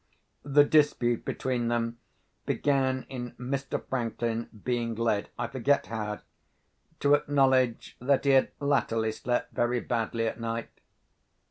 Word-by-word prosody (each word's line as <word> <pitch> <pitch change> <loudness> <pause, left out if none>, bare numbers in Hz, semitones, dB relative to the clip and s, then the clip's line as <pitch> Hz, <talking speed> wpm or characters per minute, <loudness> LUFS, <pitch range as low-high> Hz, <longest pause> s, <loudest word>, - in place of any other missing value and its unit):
The 145 +1 +5
dispute 145 -6 +2
between 125 -2 -1
them 115 0 -1 0.5
began 130 -2 +1
in 120 -2 -6
Mr. 135 +2 -3
Franklin 115 -2 -2
being 120 -2 -1
led—I 115 +1 -1
forget 135 +3 +1
how—to 115 +7 -4
acknowledge 130 -4 +2
that 140 +2 +2
he 140 - +5
had 135 -1 +5
latterly 115 -6 +1
slept 120 +2 -2
very 120 +1 +1
badly 115 -1 -1
at 110 +1 -3
night. 115 0 -3
120 Hz, 115 wpm, -28 LUFS, 115-135 Hz, 0.5 s, The